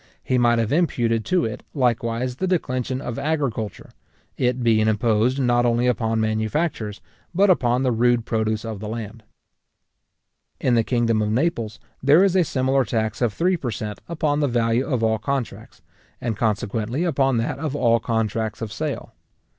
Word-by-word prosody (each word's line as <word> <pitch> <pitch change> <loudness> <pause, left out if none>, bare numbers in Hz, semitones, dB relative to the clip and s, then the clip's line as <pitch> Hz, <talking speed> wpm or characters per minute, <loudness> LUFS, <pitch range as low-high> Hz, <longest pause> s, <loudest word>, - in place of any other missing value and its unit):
He 130 - +1
might 120 -1 +4
have 115 -1 0
imputed 120 -9 +1
to 180 +4 +1
it, 110 - -4
likewise, 125 -1 0
the 190 - -1
declension 130 -7 -1
of 120 - -4
agriculture, 135 - -2 0.4
it 125 0 0
being 110 -2 +3
imposed 110 +3 +2
not 120 -2 +3
only 120 0 +2
upon 115 -2 +1
manufactures, 110 +1 -1 0.3
but 195 +1 +5
upon 125 -6 +2
the 130 - +2
rude 120 0 +2
produce 110 -1 -1
of 110 -3 -5
the 105 - -6
land. 110 0 -6 1.4
In 125 - +1
the 115 -1 +4
kingdom 115 -2 +1
of 105 - 0
Naples, 120 -3 -1 0.2
there 145 +7 +6
is 195 -2 +2
a 185 - +5
similar 135 -2 +1
tax 110 0 -2
of 120 -3 +2
three 180 - +1
per 130 -6 -4
cent. 105 -1 -5
upon 150 -3 0
the 145 - +2
value 120 0 +1
of 125 -6 -1
all 110 -1 +2
contracts, 135 +2 -4 0.4
and 115 -3 -2
consequently 110 - -1
upon 135 -7 +1
that 115 +4 -2
of 150 -2 -3
all 115 -4 +3
contracts 110 -1 -2
of 110 -1 -5
sale. - - -4
120 Hz, 170 wpm, -23 LUFS, 110-135 Hz, 1.4 s, there